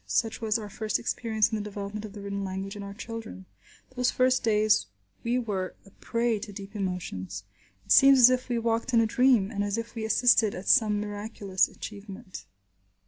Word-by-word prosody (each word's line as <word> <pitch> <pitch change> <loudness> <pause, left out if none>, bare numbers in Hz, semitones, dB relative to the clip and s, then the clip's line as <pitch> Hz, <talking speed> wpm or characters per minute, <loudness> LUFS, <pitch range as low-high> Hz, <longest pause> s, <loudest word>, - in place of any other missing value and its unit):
Such 220 - -1
was 220 -1 +1
our 215 -2 -7
first 215 +1 -2
experience 225 -2 0
in 220 - -1
the - - -3
development 205 +1 -6
of 205 - -10
the 205 - -9
written 200 0 -4
language 195 +1 -5
in 205 - -7
our 200 0 -8
children. 225 - -8 0.5
Those 250 0 +2
first 255 0 +2
days 215 -1 +3 0.4
we 235 +2 0
were 200 -6 -3
a 195 - -17
prey 230 0 -1
to 205 - -8
deep 200 +1 -10
emotions. 95 - -4 0.4
It - - -7
seemed 275 0 +8
as 255 0 +8
if 255 0 -1
we 240 - 0
walked 230 +2 0
in - - +6
a 230 - +4
dream, 235 -3 +3
and 205 -2 -2
as 205 +1 -2
if 230 0 -5
we 225 - -5
assisted 220 -1 +3
at 190 - -8
some 215 -5 +4
miraculous 205 -2 -1
achievement. 200 -1 -9
215 Hz, 195 wpm, -27 LUFS, 200-230 Hz, 0.5 s, seemed